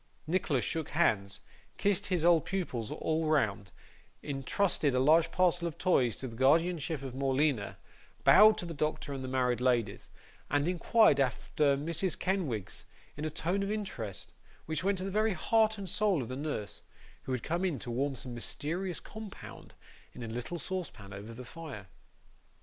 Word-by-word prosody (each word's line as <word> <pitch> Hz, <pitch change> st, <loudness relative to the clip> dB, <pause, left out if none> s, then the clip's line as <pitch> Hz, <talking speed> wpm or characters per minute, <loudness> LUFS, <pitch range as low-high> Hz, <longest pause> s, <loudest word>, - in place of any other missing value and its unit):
Nicholas 160 Hz, -6 st, 0 dB
shook 160 Hz, -2 st, -2 dB
hands, 100 Hz, -12 st, +1 dB, 0.4 s
kissed 200 Hz, 0 st, +1 dB
his 175 Hz, -3 st, 0 dB
old 170 Hz, -2 st, +5 dB
pupils 145 Hz, -, -3 dB
all 160 Hz, 0 st, -1 dB
round, 110 Hz, -10 st, +1 dB, 0.5 s
intrusted 145 Hz, +1 st, 0 dB
a -, -, +3 dB
large 160 Hz, +5 st, +4 dB
parcel 175 Hz, -1 st, +2 dB
of 165 Hz, -1 st, -6 dB
toys 150 Hz, -, +2 dB
to 130 Hz, -, -4 dB
the 115 Hz, -, -9 dB
guardianship 155 Hz, +3 st, +2 dB
of 130 Hz, -2 st, -6 dB
Morleena, 135 Hz, -3 st, 0 dB, 0.5 s
bowed 215 Hz, +2 st, +8 dB
to -, -, -4 dB
the 170 Hz, -, -5 dB
doctor 150 Hz, -1 st, -2 dB
and 135 Hz, -1 st, -5 dB
the -, -, -4 dB
married 125 Hz, -2 st, +1 dB
ladies, 120 Hz, -5 st, 0 dB, 0.4 s
and 145 Hz, +2 st, +1 dB
inquired 180 Hz, -2 st, +4 dB
after 140 Hz, +3 st, +1 dB
Mrs. 165 Hz, +4 st, -1 dB
Kenwigs 155 Hz, -, -2 dB, 0.3 s
in 150 Hz, -, -4 dB
a -, -, 0 dB
tone 175 Hz, +5 st, -1 dB
of 195 Hz, -, -2 dB
interest, 185 Hz, -, -5 dB, 0.3 s
which 160 Hz, +3 st, -2 dB
went 195 Hz, 0 st, +1 dB
to 185 Hz, -, -3 dB
the 195 Hz, -, -3 dB
very 215 Hz, +1 st, +2 dB
heart 220 Hz, +5 st, +2 dB
and 200 Hz, -1 st, -6 dB
soul 195 Hz, -5 st, +1 dB
of 115 Hz, -, -8 dB
the 130 Hz, -, -4 dB
nurse, 140 Hz, -7 st, -4 dB, 0.4 s
who -, -, -4 dB
had 125 Hz, -2 st, -2 dB
come 170 Hz, +3 st, -1 dB
in 175 Hz, -7 st, 0 dB
to 120 Hz, -, -6 dB
warm 135 Hz, +3 st, -1 dB
some 125 Hz, 0 st, -7 dB
mysterious 165 Hz, +9 st, -3 dB
compound, 215 Hz, -2 st, -10 dB, 0.4 s
in -, -, -8 dB
a -, -, -5 dB
little 125 Hz, +9 st, -4 dB
saucepan 165 Hz, -, -6 dB
over 100 Hz, +3 st, -8 dB
the 125 Hz, +2 st, -9 dB
fire. 145 Hz, -7 st, -8 dB
155 Hz, 170 wpm, -31 LUFS, 125-180 Hz, 0.5 s, bowed